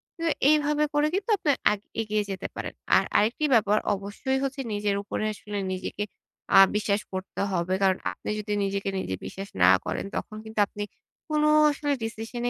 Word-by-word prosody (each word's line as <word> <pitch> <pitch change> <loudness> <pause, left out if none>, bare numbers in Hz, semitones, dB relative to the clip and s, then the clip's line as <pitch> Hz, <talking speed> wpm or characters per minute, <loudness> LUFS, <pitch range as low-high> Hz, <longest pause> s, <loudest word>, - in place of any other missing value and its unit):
কিন্তু 330 -1 -1 0.2
এইভাবে 300 0 +3
করে 295 +1 +3
কিন্তু 400 +4 -2
আপনি 300 - +2 0.2
আ - - +3 0.3
এগিয়ে 215 -1 0
যেতে 190 - -4
পারেন। - - -5 0.2
আর - - +5
আরেকটি 235 +8 +2
ব্যাপার 210 -2 +4 0.2
অবশ্যই 205 +7 -2
হচ্ছে 270 0 -2
নিজের 205 -1 0
উপরে 210 - -3
আসলে 205 0 -7 0.2
নিজেকে 185 +2 -4 0.5
আ - - +11 0.2
বিশ্বাস 210 -1 +1
করতে 185 0 -4
হবে। 180 0 0
কারণ 190 -1 +4
আপনি - - -8
যদি 210 0 -3
নিজেকে 195 0 -1
নিজে 95 - -3
বিশ্বাস 195 +1 -7
না 90 - +8 0.2
করেন - - -3
তখন 215 - -4
কিন্তু 220 -1 -5
আপনি 205 +1 -5 0.5
কোন 300 0 +2 0.3
আসলে 290 0 -1
ডিসিশন 225 +2 -5
210 Hz, 175 wpm, -26 LUFS, 200-275 Hz, 0.5 s, আ